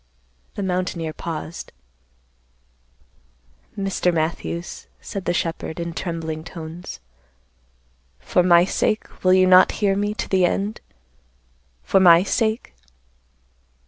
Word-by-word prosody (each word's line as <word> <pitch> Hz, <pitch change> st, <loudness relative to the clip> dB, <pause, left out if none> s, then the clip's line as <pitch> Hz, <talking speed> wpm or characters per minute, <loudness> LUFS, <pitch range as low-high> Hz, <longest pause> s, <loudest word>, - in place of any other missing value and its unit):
The 200 Hz, -, -3 dB
mountaineer 180 Hz, -3 st, -2 dB
paused. 165 Hz, 0 st, -6 dB, 2.1 s
"Mr. 195 Hz, -2 st, 0 dB
Matthews," 170 Hz, +1 st, -3 dB
said 195 Hz, -2 st, -7 dB
the -, -, +1 dB
shepherd, 165 Hz, -1 st, -3 dB
in 170 Hz, 0 st, -4 dB
trembling 165 Hz, -2 st, -4 dB
tones, 165 Hz, -, -8 dB, 1.2 s
"for 180 Hz, -, +1 dB
my 175 Hz, -1 st, +5 dB
sake, 215 Hz, +2 st, -2 dB
will 185 Hz, 0 st, +5 dB
you 185 Hz, 0 st, +5 dB
not 185 Hz, 0 st, +6 dB
hear 200 Hz, -3 st, +1 dB
me 205 Hz, +1 st, -1 dB
to -, -, -4 dB
the 190 Hz, -1 st, +2 dB
end? 200 Hz, +4 st, -1 dB, 1.0 s
for 195 Hz, -, +3 dB
my 175 Hz, -2 st, +7 dB
sake?" 220 Hz, -, -1 dB
180 Hz, 110 wpm, -22 LUFS, 165-195 Hz, 2.1 s, my